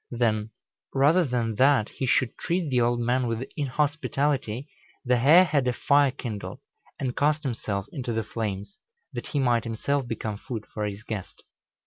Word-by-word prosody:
Then, 110 -3 0 0.5
rather 150 +7 +5
than 120 -6 -1
that 130 -4 +4
he 130 - -3
should 125 0 +2
treat 170 -4 -1
the 125 -1 +3
old 120 0 +2
man 125 +1 +1
with 115 +3 -2
inhospitality, 145 -3 -1 0.4
the 125 0 +3
hare 150 +9 +7
had 145 -7 +1
a 125 - +2
fire 140 +2 +4
kindled, 120 -6 -6 0.4
and 125 -2 -2
cast 150 +2 +2
himself 110 -7 -2
into 125 -5 -3
the 110 -1 -1
flames, 105 - -5 0.3
that - - -5
he - - -3
might 120 -4 +2
himself 125 +4 -1
become 110 -2 -3
food 110 -1 -6
for 105 - -2
his 100 +1 -7
guest. 105 -5 -6
125 Hz, 165 wpm, -26 LUFS, 115-140 Hz, 0.5 s, hare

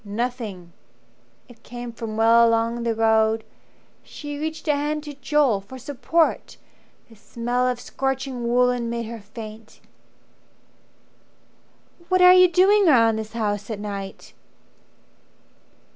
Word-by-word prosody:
"Nothing." 210 -5 -5 0.7
It 235 -2 -18
came 240 0 -8
from 225 -2 -6
well 230 +1 +5
along 230 +1 0
the 230 -1 -1
road. 220 0 +2 0.6
She 290 -1 -8
reached 315 +1 -5
a 300 - +3
hand 295 +1 -2
to 295 -1 -8
Joel 280 -7 +1
for 220 +7 -11
support: 285 +5 -1 0.5
The 225 - -18
smell 240 +4 -2
of 250 -1 -2
scorching 265 -2 -3
woollen 245 -1 +1
made 235 0 -3
her 230 0 -8
faint. 215 +1 -11 2.3
"What 370 -1 +3
are 360 0 +9
you 365 0 +7
doing 385 +3 +4
round 230 -6 +4
this 220 0 -7
house 205 -2 -3
at 215 -3 -4
night?" 200 -2 -7
235 Hz, 125 wpm, -23 LUFS, 220-275 Hz, 2.3 s, are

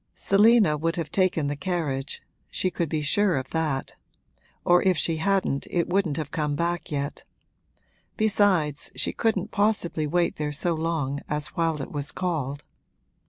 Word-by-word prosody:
Selina 205 -5 +4
would 165 +2 -1
have 160 -3 -4
taken 185 -5 +2
the 145 +1 -1
carriage 145 -5 -3 0.3
she 185 - -1
could 170 -3 -2
be 155 -1 -1
sure 185 +2 +2
of 130 0 -5
that; 155 -5 -1 0.7
or 175 0 +5
if 185 -3 +2
she 165 0 +1
hadn't 190 -5 0
it 175 -1 0
wouldn't 175 -6 +1
have 155 -2 -4
come 150 -3 -1
back 170 +2 -2
yet; 140 -1 -3 0.9
besides, 195 -9 +2
she - - 0
couldn't 215 -3 0
possibly 205 -7 0
wait 175 +3 +1
there 150 -1 -2
so 165 +4 0
long 160 -4 -1
as 150 0 -1
while 165 -3 -1
it - - -8
was 145 -1 -2
called. 145 -6 -3
165 Hz, 160 wpm, -26 LUFS, 150-185 Hz, 0.9 s, or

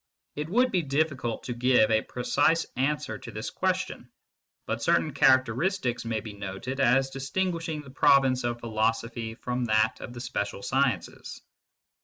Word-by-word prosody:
It 150 +2 -4
would 250 +6 +3
be 185 - +2
difficult 140 -5 -1
to 125 - -4
give 120 -2 +3
a 110 0 +4
precise 145 +8 +1
answer 140 +4 -1
to - - -9
this - - -5
question, - - -2 0.6
but - - -3
certain - - +2
characteristics 130 - +2
may 115 -1 -2
be 110 -1 -8
noted 100 +7 -6
as 135 +1 +3
distinguishing 160 +3 -2
the 135 - -13
province 135 -2 +4
of 120 0 -2
philosophy 115 0 -1
from 125 +1 -3
that 110 -1 +2
of 120 - -7
the 120 - -8
special 100 -4 -3
sciences. 130 -6 -1
125 Hz, 150 wpm, -27 LUFS, 115-145 Hz, 0.6 s, a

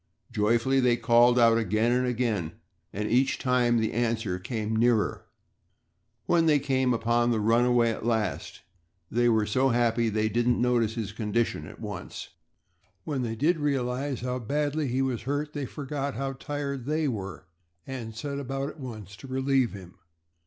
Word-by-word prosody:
Joyfully, 115 +4 +2
they 125 -2 +3
called 120 +1 +4
out 115 -1 +5
again 110 +2 +1
and 125 +1 +2
again 115 -9 -1 0.4
and 105 +2 -3
each 130 +4 +2
time 125 -2 +2
the 110 -1 0
answer 115 -5 -1
came 110 +2 -3
nearer. 115 -1 +1 1.0
When 165 -1 +3
they 150 -2 +5
came 130 -2 +1
upon 120 +1 +2
the 115 -2 +1
runaway 120 +2 +3
at - - -6
last 110 -2 -2 0.5
they 120 +1 +3
were 110 -2 +3
so 130 +6 +2
happy 115 -1 +2
that 105 - -6
they 110 - +2
didn't 120 +2 +1
notice 120 -3 +1
his 110 -4 -3
condition 110 +1 -1
at - - -12
once. - - -7 0.7
When 145 -4 -2
they 115 -2 -2
did 160 +8 +1
realize 135 -2 -1
how 125 0 -2
badly 145 +4 -1
he 130 +2 0
was 130 -3 -1
hurt, 145 +4 -3
they 145 -3 -3
forgot 140 0 -4
how 135 0 -3
tired 140 -1 -4
they 155 +1 +1
were 100 -7 -5 0.4
and 115 -4 -6
set 140 +4 -4
about 135 +1 -3
at 155 - -12
once 110 -7 -8
to 135 - -11
relieve 130 -2 +1
him. 95 -3 -11
120 Hz, 165 wpm, -27 LUFS, 115-135 Hz, 1.0 s, out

